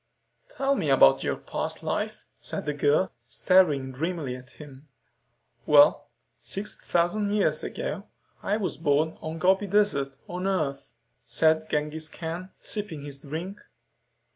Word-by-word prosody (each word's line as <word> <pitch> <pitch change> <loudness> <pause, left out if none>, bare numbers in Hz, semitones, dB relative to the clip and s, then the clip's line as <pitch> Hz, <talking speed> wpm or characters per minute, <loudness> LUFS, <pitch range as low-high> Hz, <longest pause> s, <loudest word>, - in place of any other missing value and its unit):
"Tell 275 - 0
me 160 - -1
about 130 - +6
your - - 0
past - - -5
life," - - -3
said - - -5
the 150 - -1
girl, 145 +6 +2 0.2
staring 150 -8 +3
dreamily 150 -1 -3
at 130 +1 -12
him. 145 -1 -12 0.8
"Well, - - +6 0.3
six 210 +1 -3
thousand 200 +5 +1
years 205 0 +1
ago, - - -4 0.3
I 205 - 0
was 200 -4 -3
born 155 0 +1
in 160 - -4
the 165 - -7
Gobi 190 +4 +3
Desert, 175 -10 +1
on 180 +2 -3
Earth," 140 -10 -2 0.3
said 160 0 +2
Genghis 150 +1 -1
Khan, 170 +2 -6
sipping 195 -9 -5
his 140 -1 -7
drink. 165 +7 -6
160 Hz, 140 wpm, -27 LUFS, 145-190 Hz, 0.8 s, about